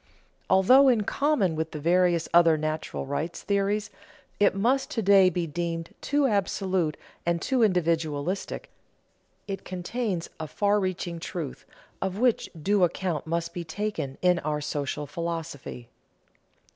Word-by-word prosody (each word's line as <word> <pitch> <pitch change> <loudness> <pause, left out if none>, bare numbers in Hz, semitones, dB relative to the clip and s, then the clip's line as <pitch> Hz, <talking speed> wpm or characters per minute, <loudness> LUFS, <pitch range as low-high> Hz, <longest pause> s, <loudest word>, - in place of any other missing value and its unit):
Although, 250 +9 +6
in 240 -4 +4
common 215 - +1
with 160 0 -2
the 155 - -4
various 175 +1 +2
other 170 -2 +6
"natural 155 -1 -3
rights" 150 +5 -3
theories, 205 +1 0 0.5
it 205 -1 +4
must 245 +7 +1
to 225 - -2
day 195 -1 +6
be 175 -1 -2
deemed 165 +1 -4
too 285 0 +1
absolute 190 - 0 0.3
and 170 0 0
too 260 +7 0
individualistic, 165 -3 0 0.8
it 195 -2 -5
contains 185 0 -3
a 160 - -4
far 205 +5 +1
reaching 180 -3 -3
truth, 165 -4 -6 0.3
of 190 0 -2
which 245 0 +2
due 200 +4 +2
account 170 -3 -1
must 170 +1 -2
be 175 - -4
taken 160 -5 -4
in 180 -1 +4
our 150 -1 -2
social 145 0 -3
philosophy. 165 -5 -5
175 Hz, 135 wpm, -27 LUFS, 160-200 Hz, 0.8 s, Although